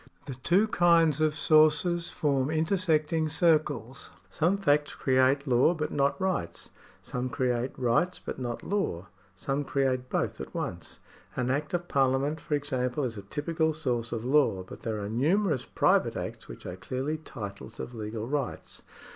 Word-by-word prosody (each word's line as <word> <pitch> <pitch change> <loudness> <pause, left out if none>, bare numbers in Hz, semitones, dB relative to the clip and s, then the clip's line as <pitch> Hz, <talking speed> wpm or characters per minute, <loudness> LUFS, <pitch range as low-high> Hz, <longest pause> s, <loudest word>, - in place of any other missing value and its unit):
The 135 - -5
two 175 - +2
kinds 165 -6 +4
of 155 -1 +2
sources 165 +3 +4
form 140 -4 0
intersecting 160 -2 +1
circles. 150 -6 +1 0.2
Some 175 +5 +1
facts 150 -6 +1
create 130 +2 +2
law 130 +6 +3
but 150 -1 -3
not 140 +3 +1
rights; 185 - -2 0.3
some 125 +1 -3
create 125 -1 -1
rights 130 +9 +1
but - - -7
not 120 -2 -4
law; 195 - -2 0.3
some 135 +9 -2
create 130 -2 0
both - - -1
at - - -9
once. - - -5 0.3
An 125 0 0
act 145 +5 -1
of 175 0 -3
Parliament 135 +2 +1
for 150 - -1
example 130 -2 -1
is 120 -3 -2
a 100 - -6
typical 160 - -1
source 125 -6 -2
of 115 0 -3
law; 130 -9 +3
but 95 - -11
there 110 -2 -3
are 100 - -4
numerous 150 - +1
private - - +2
acts - - -6
which - - -11
are 90 - -6
clearly 130 +11 -3
titles 110 -6 -8
of 125 - -6
legal 110 0 -5
rights. 145 +1 -4
140 Hz, 160 wpm, -28 LUFS, 125-160 Hz, 0.3 s, kinds